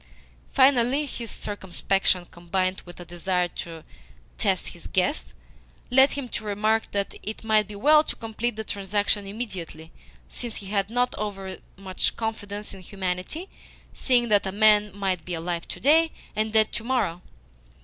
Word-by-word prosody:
Finally, 265 +1 +4
his 235 -4 -6
circumspection, 195 -2 0
combined 185 +2 -1
with 175 - -10
a 175 - -8
desire 175 +1 0
to 165 -2 -7 0.6
test - - +1
his - - -10
guest, - - 0 0.6
led 265 +2 +6
him 280 -3 -4
to 230 - -4
remark 215 +2 +1
that 200 -1 -1
it 215 +2 -5
might 215 -2 +3
be 210 - -8
well 300 +8 +6
to - - -3
complete 225 +1 -3
the 220 - -4
transaction 205 0 0
IMMEDIATELY, 185 -7 -6 0.4
since 240 -3 -5
he 205 - -7
had 200 -1 +1
not 245 +2 +1
overmuch 195 -2 -4
confidence 210 -2 -4
in 190 - -10
humanity, 185 - -4 0.5
seeing 245 -2 +2
that 205 -2 +4
a - - -1
man 210 0 +5
might 190 -4 -1
be 180 +1 -3
alive 170 +1 -3
to - - -7
day 320 +5 +5 0.3
and 215 +1 0
dead 220 -1 +5
to 235 - -4
morrow. 230 -9 0
205 Hz, 155 wpm, -26 LUFS, 185-230 Hz, 0.6 s, led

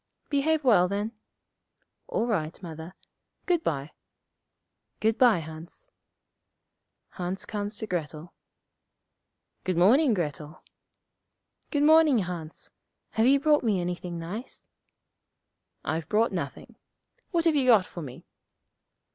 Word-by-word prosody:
'Behave 300 +2 +1
well, 210 -9 +5
then.' 205 +3 -2 1.0
'All 225 - -1
right, 165 -9 -2
Mother. 165 +1 -8 0.5
Good 345 -3 +1
bye.' 140 0 -2 1.1
'Good 220 +1 +1
bye, 245 -5 +6
Hans.' 160 - -10 1.2
Hans 180 +1 -5
comes 205 0 -3
to 220 - -3
Grettel. 165 -3 -5 1.3
'Good 185 -2 -1
morning, 235 - +5
Grettel.' 155 -2 -5 1.1
'Good 290 -2 +1
morning, 310 -3 +6
Hans. 175 -5 -5 0.4
Have 220 +2 +2
you 275 +1 +5
brought 295 0 +3
me 210 -5 +1
anything 175 0 -4
nice?' 190 +10 -7 1.2
'I've 160 -1 -2
brought 225 +2 +2
nothing. - - -6 0.5
What 340 -2 0
have 325 -2 +4
you 270 -3 +2
got 220 -7 +6
for 175 - -8
me?' 130 -5 -9
200 Hz, 115 wpm, -27 LUFS, 165-255 Hz, 1.3 s, bye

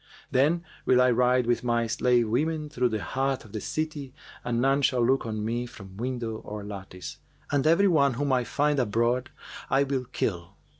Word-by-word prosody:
Then 155 +6 +2 0.2
will 125 - +4
I 125 0 +5
ride 125 +1 +3
with 120 +1 +1
my 120 -1 +1
slave 120 +1 +2
women 150 +6 -1
through 125 -4 +1
the 110 -4 -3
heart 135 +5 -1
of 110 - -14
the 110 - -5
city 150 -2 -4 0.3
and 120 -1 -1
none 135 +3 +3
shall 125 -3 +2
look 130 -1 +1
on 110 -1 -3
me 120 +2 -2
from 95 -6 -12
window 120 -2 -3
or 105 -1 -7
lattice; 95 -3 -8 0.3
and 145 +1 +2
every 170 +5 +5
one 140 -7 +3
whom 140 +1 0
I 125 -1 +2
find 145 +3 +1
abroad 120 +2 +1 0.4
I 135 +1 +3
will 135 -2 -2
kill.' 90 -7 -3
125 Hz, 190 wpm, -27 LUFS, 115-140 Hz, 0.4 s, I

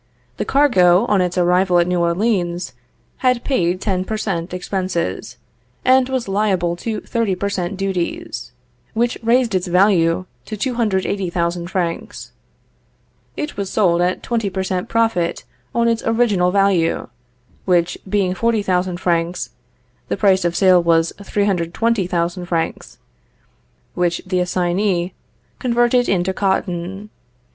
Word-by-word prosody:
The - - -2
cargo, 200 -9 +4
on 205 -5 +2
its 180 0 -1
arrival 180 +1 +3
at 175 - +4
New 180 0 0
Orleans, 175 - 0 0.4
had 250 -2 +1
paid 180 -9 0
ten 185 -2 -1
per 215 +3 -3
cent. 180 -5 -3
expenses, 180 - -3 0.5
and 260 0 +4
was 260 -4 -2
liable 195 -4 +1
to 220 +3 -4
thirty 230 -5 -1
per 200 +2 -2
cent. 185 0 -3
duties; 185 -9 -3 0.4
which 235 +2 +1
raised 235 0 +2
its 185 0 0
value 180 -1 +3 0.2
to 215 - -6
280,000 190 -7 -1
francs. 175 -3 -3 1.1
It 300 0 -4
was 200 -1 -3
sold 175 -5 +2
at 180 +1 0
twenty 225 -4 -1
per 190 0 -3
cent. 185 -1 -3
profit 225 -7 0 0.3
on 235 0 +3
its 230 -1 +1
original 225 -6 +2
value, 190 -3 +2 0.6
which 175 -2 +2
being 190 -2 +1
40,000 185 -4 0
francs, 170 0 -1 0.6
the - - -2
price 190 -2 +3
of 175 0 0
sale 185 -2 +5
was 165 -1 +2
320,000 180 -2 0
francs, 165 -2 -3 1.0
which 175 -1 0
the 185 -1 0
assignee 180 0 0 0.5
converted 240 0 +2
into 190 0 +1
cotton. 190 +1 -2
185 Hz, 125 wpm, -19 LUFS, 175-215 Hz, 1.1 s, sale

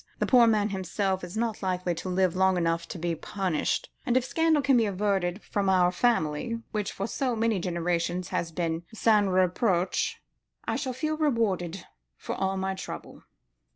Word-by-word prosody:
The - - 0
poor 245 -3 +6
man 215 -2 +2
himself 190 0 -1
is 180 +4 -6
not 230 -2 -1
likely 180 -2 -1
to 180 +3 -5
live 185 -1 +1
long 190 0 +3
enough 165 -1 0
to - - -6
be 170 0 -1
punished; 180 0 -2
and 250 -2 +2
if 255 - +1
scandal 320 0 +2
can 270 0 +4
be 230 -3 +3
averted 195 -1 -1
from 200 -2 -1
our 180 -2 +4
family, 230 +1 0
which 210 -2 -2
for 195 - -4
so 250 +2 -1
many 225 -2 +1
generations 175 0 -1
has 170 - -2
been 165 -1 -2
sans 215 -2 +3
reproche, 185 0 +1 0.5
I - - 0
shall 260 -3 -2
feel 310 +5 -2
rewarded 200 - 0 0.3
for - - -5
all 190 0 -1
my 190 0 -1
trouble." 190 - -8
190 Hz, 175 wpm, -27 LUFS, 175-225 Hz, 0.5 s, poor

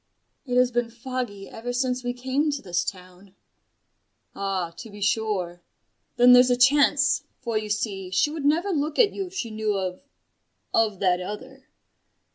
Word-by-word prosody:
"It 250 0 0
has 250 0 +4
been 240 -1 0
foggy 235 -4 -5
ever 240 +2 -6
since 250 0 -1
we 245 - -1
came 260 +5 -1
to 280 - -4
this 180 -2 -1
town." 185 +1 -9 1.0
"Ah, 190 -3 -2
to 230 - -9
be 205 0 -11
sure. 200 -4 -1 0.5
Then 245 +1 +7
there's 250 0 +7
a 245 - +3
chance: 280 +2 +4 0.2
for, 235 -3 -4
you 215 0 -1
see, 205 -3 -2
she 190 +11 +2
would 310 -2 -5
never 330 +7 +2
look 300 -2 -1
at 445 -5 +4
you 390 -1 -4
if 370 - -14
she 235 - -3
knew 215 -1 -1
of 185 -1 -4 0.7
of 215 -3 +2
that 180 -2 +2
other. 260 +8 -8
235 Hz, 170 wpm, -25 LUFS, 200-260 Hz, 1.0 s, Then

